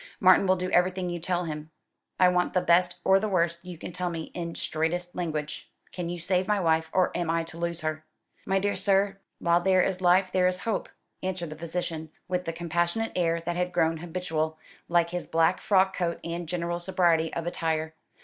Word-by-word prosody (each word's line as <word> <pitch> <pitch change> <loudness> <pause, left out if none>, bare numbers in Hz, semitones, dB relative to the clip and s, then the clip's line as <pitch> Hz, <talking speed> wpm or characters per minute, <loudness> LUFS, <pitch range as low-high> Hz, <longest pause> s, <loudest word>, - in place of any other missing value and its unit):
"Martin 185 0 +6
will 185 - +5
do 185 0 -3
everything 180 0 +2
you 175 - -3
tell 175 +1 -1
him. 155 -1 -5 0.5
I 185 - +7
want 180 0 +1
the 180 - +4
best 175 0 +3
or 190 0 +5
the 215 +1 -2
worst 170 -3 +1
you 180 -2 -8
can 165 - -7
tell 180 +1 -2
me 165 -2 -5
in 170 -1 -4
straightest 175 +3 -1
language. 155 -4 -4 0.2
Can 175 -2 -4
you 175 - -3
save 185 +2 0
my 210 -1 +2
wife, 160 -2 +2
or 185 -1 +2
am 175 -2 -1
I 165 0 +1
to 165 0 -10
lose 170 0 -2
her?" 155 0 -3 0.4
"My 195 - +1
dear 200 +1 0
sir, 195 0 +2 0.2
while 170 +1 +2
there 185 0 +4
is 185 -1 -1
life 185 +1 +4
there 185 -1 +3
is 180 0 -1
hope," 225 - -2 0.3
answered 185 -3 -3
the - - -6
physician, 160 -1 -4 0.2
with 180 0 -1
the 165 - -1
compassionate 170 +6 -1
air 170 -2 +1
that 170 +1 -3
had 180 0 -1
grown 165 -1 +2
habitual, 160 -2 -2 0.3
like 170 0 +3
his 180 0 -4
black 165 +2 +2
frock 190 -1 +3
coat 170 -2 -1
and 170 -1 -4
general 175 0 -2
sobriety 175 -3 +2
of 170 - -3
attire. 160 -2 -1
175 Hz, 205 wpm, -27 LUFS, 165-185 Hz, 0.5 s, I